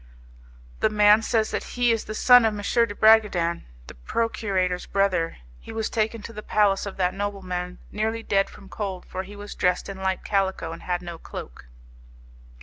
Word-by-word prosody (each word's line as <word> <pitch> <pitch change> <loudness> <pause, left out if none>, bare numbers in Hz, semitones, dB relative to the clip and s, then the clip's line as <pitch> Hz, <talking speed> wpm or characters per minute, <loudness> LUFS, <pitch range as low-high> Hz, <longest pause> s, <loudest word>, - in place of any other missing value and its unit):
The - - +3
man 210 0 +5
says 220 -1 0
that - - -2
he 245 -1 +4
is 225 -1 -1
the 215 - -6
son 245 +2 +7
of 220 -1 +1
M. 230 +3 +1
de 205 - -7
Bragadin, 205 -7 +4 0.2
the - - -10
procurator's 185 - -1
brother. 190 -4 0 0.2
He - - -11
was 220 -1 -3
taken 220 -1 -1
to 230 - -8
the 210 - -7
palace 205 -2 +2
of 200 - -7
that 180 -1 +1
nobleman 185 -3 -4
nearly 220 +2 -2
dead 195 -2 +1
from 195 - -14
cold, 190 -2 -5
for 185 - -5
he 195 +2 -10
was 205 0 -8
dressed 180 +2 0
in 195 - -6
light 190 -1 -2
calico, 190 -4 -1
and 165 - -8
had 180 0 -2
no 170 -1 -7
cloak. - - -9
200 Hz, 185 wpm, -25 LUFS, 180-215 Hz, 0.2 s, son